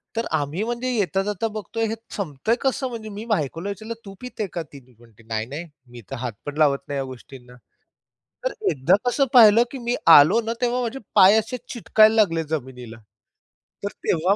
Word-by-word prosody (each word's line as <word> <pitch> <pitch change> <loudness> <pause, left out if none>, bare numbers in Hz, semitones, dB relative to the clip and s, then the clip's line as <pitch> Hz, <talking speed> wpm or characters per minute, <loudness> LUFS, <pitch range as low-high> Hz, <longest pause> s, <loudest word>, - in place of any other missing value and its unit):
तर 230 0 -1
आम्ही 150 +7 -3
म्हणजे 240 +2 -3
येता-जाता 205 0 -1
बघतोय, 220 +1 -4
हे 220 - -3 0.2
संपतं 160 -1 -3
आहे 235 - +3
कसं, 265 0 0
म्हणजे 225 -3 -7
मी 210 +2 -7
बायकोला 170 - -2
विचारलं 215 +3 -6
"तू 195 - -9
पिते 250 -4 -5
का 170 - -3
ती 145 -2 -14
दी", 125 -2 -24
म्हणते 115 -2 -20
"नाही-नाही 115 +9 -4 0.3
मी 120 -1 -11
तर - - -3
हात 120 -2 -4
पण 145 0 -6
लावत 145 -3 +3
नाही 140 - -3
या 135 - -1
गोष्टींना". 125 -1 -12 0.9
तर - - 0 0.2
एकदा 130 +4 +3
कसं 275 +3 +2
पाहिलं, 230 -2 +8
की 275 - -6
मी 240 - +1 0.2
आलो 165 +11 +5
ना, 225 0 -3
तेव्हा 245 0 +1
माझे 245 +2 -4 0.2
पाय 195 +3 +7
असे 240 +4 -5
चिटकायला 220 -2 +4
लागले 165 -5 0
जमिनीला. 125 -6 -5 0.9
तर 200 - -1 0.2
तेव्हा 180 +4 +2
195 Hz, 190 wpm, -23 LUFS, 140-225 Hz, 0.9 s, पाहिलं